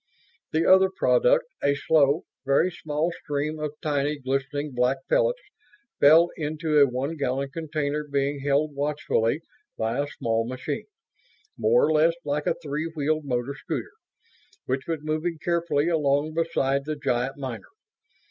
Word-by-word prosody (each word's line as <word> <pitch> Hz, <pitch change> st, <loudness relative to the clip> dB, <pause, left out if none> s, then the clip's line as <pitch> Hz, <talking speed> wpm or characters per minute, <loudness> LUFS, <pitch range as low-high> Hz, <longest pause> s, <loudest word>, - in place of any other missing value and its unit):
The 160 Hz, +1 st, +1 dB
other 190 Hz, 0 st, +6 dB
product, -, -, +3 dB, 0.2 s
a 140 Hz, 0 st, +3 dB
slow, 145 Hz, +1 st, +3 dB, 0.2 s
very 140 Hz, +6 st, +2 dB
small 155 Hz, +1 st, -2 dB
stream 150 Hz, +1 st, -2 dB
of 150 Hz, -1 st, -4 dB
tiny, 145 Hz, 0 st, 0 dB
glistening 140 Hz, +2 st, -2 dB
black 125 Hz, +2 st, +2 dB
pellets, -, -, +1 dB, 0.6 s
fell 160 Hz, +4 st, +6 dB
into 155 Hz, 0 st, 0 dB
a 140 Hz, -, +7 dB
one 135 Hz, +5 st, -3 dB
gallon 135 Hz, -1 st, -1 dB
container 150 Hz, -2 st, -2 dB
being 140 Hz, 0 st, -1 dB
held 145 Hz, +2 st, +1 dB
watchfully 145 Hz, -2 st, 0 dB, 0.4 s
by 115 Hz, +3 st, -1 dB
a 145 Hz, -, 0 dB
small 115 Hz, -4 st, -1 dB
machine, 130 Hz, +3 st, -4 dB, 0.7 s
more 475 Hz, +2 st, +3 dB
or -, -, +1 dB
less 160 Hz, +2 st, +4 dB
like 150 Hz, +1 st, -1 dB
a -, -, +2 dB
three 150 Hz, +2 st, -2 dB
wheeled 155 Hz, -1 st, -1 dB
motor 125 Hz, 0 st, -2 dB
scooter, 145 Hz, -, -5 dB, 0.7 s
which 130 Hz, +1 st, -2 dB
was 160 Hz, -3 st, -3 dB
moving 155 Hz, +2 st, -2 dB
carefully 170 Hz, -2 st, 0 dB
along 150 Hz, -2 st, +1 dB
beside 140 Hz, -4 st, 0 dB
the 155 Hz, 0 st, -2 dB
giant 135 Hz, -2 st, -1 dB
miner. 130 Hz, -4 st, -6 dB
145 Hz, 145 wpm, -25 LUFS, 140-160 Hz, 0.7 s, a